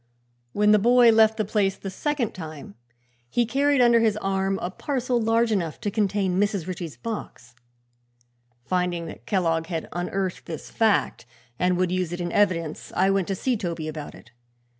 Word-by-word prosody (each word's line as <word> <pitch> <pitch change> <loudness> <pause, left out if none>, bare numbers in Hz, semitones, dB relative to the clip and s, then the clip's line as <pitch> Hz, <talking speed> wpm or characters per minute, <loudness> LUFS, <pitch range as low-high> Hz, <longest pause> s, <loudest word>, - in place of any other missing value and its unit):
When 210 +5 +3
the 210 - +6
boy 240 +2 +6
left 220 0 +4
the 215 - 0
place 200 -2 0
the 195 - -6
second 285 +2 -1
time 155 - -9 0.6
he 240 - +1
carried 280 +2 +2
under 235 -1 +5
his 220 -2 +2
arm 195 -1 -1
a 180 - -4
parcel 250 +1 -1
large 225 +1 +2
enough 170 -7 -1
to 205 - -2
contain 195 -3 0
Mrs. 200 -4 0
Ritchie's 175 -4 -6
box. 205 - -7 1.1
Finding 180 -2 -1
that - - -10
Kellogg 165 -5 0
had 165 -3 -4
unearthed 180 +2 -3
this 160 -4 -7
fact 220 - +1 0.3
and 180 0 +2
would 180 -1 +1
use 185 -2 -1
it 175 - -4
in 175 -1 -3
evidence, 170 -6 0
I 190 +1 +3
went 195 -2 0
to 195 - -1
see 255 +6 0
Toby 170 -6 -4
about 155 -1 -7
it. 115 - -17
195 Hz, 175 wpm, -25 LUFS, 175-220 Hz, 1.1 s, the